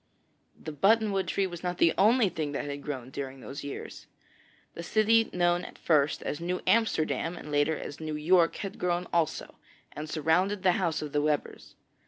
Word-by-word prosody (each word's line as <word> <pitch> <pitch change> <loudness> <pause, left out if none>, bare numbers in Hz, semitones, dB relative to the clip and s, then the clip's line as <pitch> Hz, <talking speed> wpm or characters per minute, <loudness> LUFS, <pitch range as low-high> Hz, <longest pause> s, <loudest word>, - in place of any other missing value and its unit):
The 155 - -7
button 210 +8 +3
wood 195 -1 -1
tree 195 - 0
was 175 -2 -6
not 180 -1 -3
the 165 - +4
only 220 +3 +4
thing 155 -5 -3
that 140 - -3
had 145 0 -5
grown 130 -3 -6
during 135 -1 -6
those 140 +3 -8
years. 140 - -8 0.7
The - - -7
city 220 +5 +3
known 175 0 +1
at - - -10
first 150 -2 +1
as 150 - -4
'New 180 +1 -2
Amsterdam,' 175 -6 +1
and 150 - -9
later 145 +2 +2
as 145 - -7
'New 155 -1 -4
York,' 165 +2 +3
had 195 -1 -6
grown 180 0 0
also, 170 -3 -1 0.3
and 150 +1 -7
surrounded 180 +6 +1
the 185 - +5
house 160 -3 0
of 150 - -6
the 145 - +2
Webbers. 150 -1 -2
165 Hz, 190 wpm, -28 LUFS, 150-185 Hz, 0.7 s, the